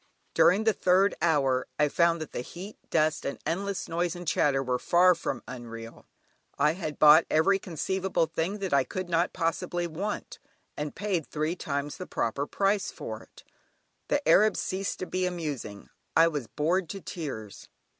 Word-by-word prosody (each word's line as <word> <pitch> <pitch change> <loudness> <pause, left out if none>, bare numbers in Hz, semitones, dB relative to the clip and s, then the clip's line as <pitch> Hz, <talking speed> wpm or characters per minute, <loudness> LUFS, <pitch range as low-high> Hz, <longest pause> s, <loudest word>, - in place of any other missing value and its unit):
During 195 +5 +5
the 220 -1 +3
third 185 +2 +3
hour 140 -6 +2
I 150 - +4
found 170 +2 +2
that 155 - -6
the - - -3
heat, 185 +10 -9
dust, 155 0 +1
and 140 - -3
endless 195 +3 -2
noise 170 +1 -1
and 175 -1 -8
chatter 135 -4 +2
were 125 -1 -1
far 180 +5 +5
from 165 - -4
unreal. 115 -2 -9 0.5
I 150 +2 +4
had 160 -4 -5
bought 155 +1 +7
every 195 +5 +3
conceivable 185 0 -1
thing 175 +6 -2
that 190 -5 -2
I 140 -1 +5
could 185 +5 -5
not 170 +1 +1
possibly 175 0 -1
want, 185 +6 -4 0.4
and 150 0 -4
paid 185 -5 -2
three 155 +3 -2
times 145 -3 -3
the 185 - -7
proper 140 +5 -2
price 200 0 +1
for - - -7
it. - - -17 0.6
The 290 0 0
Arabs 215 +1 +5
ceased 190 +1 -2
to - - -1
be 185 0 -1
amusing; 145 - -5 0.3
I 165 +1 +7
was 145 -7 -4
bored 170 +4 0
to 195 - -5
tears. 130 - -7
165 Hz, 170 wpm, -28 LUFS, 145-185 Hz, 0.6 s, bought